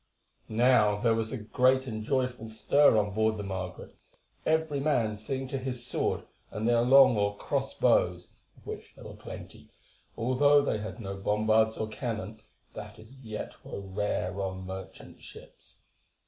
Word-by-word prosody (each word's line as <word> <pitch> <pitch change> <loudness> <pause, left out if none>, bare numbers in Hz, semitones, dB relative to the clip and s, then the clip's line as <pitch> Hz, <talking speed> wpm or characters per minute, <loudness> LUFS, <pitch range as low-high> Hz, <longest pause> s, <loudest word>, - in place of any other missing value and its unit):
Now 110 -2 +4
there 115 +1 +3
was 110 0 -2
a 130 - -3
great 130 +4 +2
and 110 -4 -5
joyful 125 -2 -1
stir 110 +3 +4
on 105 -1 +1
board 110 +1 +1
the 105 - -4
Margaret, 95 -2 -6 0.5
every 160 -2 +1
man 125 -7 +1
seeing 130 +5 -4
to 135 - -3
his 125 -2 -4
sword - - -1 0.3
and 110 +2 -3
their 120 -1 +4
long 130 0 +7
or 100 0 0
cross - - -2
bows, 90 0 +2 0.3
of - - -21
which - - -8
there - - -13
were - - -8
plenty, - - -11 0.5
although 140 +5 +4
they 110 - 0
had 110 +3 -7
no 100 -3 -5
bombards 110 +2 +2
or 110 - -2
cannon, 110 -2 -5 0.3
that - - -9
as 110 +4 -15
yet 110 -4 -7
were - - -7
rare 100 -1 -2
on 95 -1 -4
merchant 95 0 -9
ships. - - -13
110 Hz, 160 wpm, -29 LUFS, 105-130 Hz, 0.5 s, long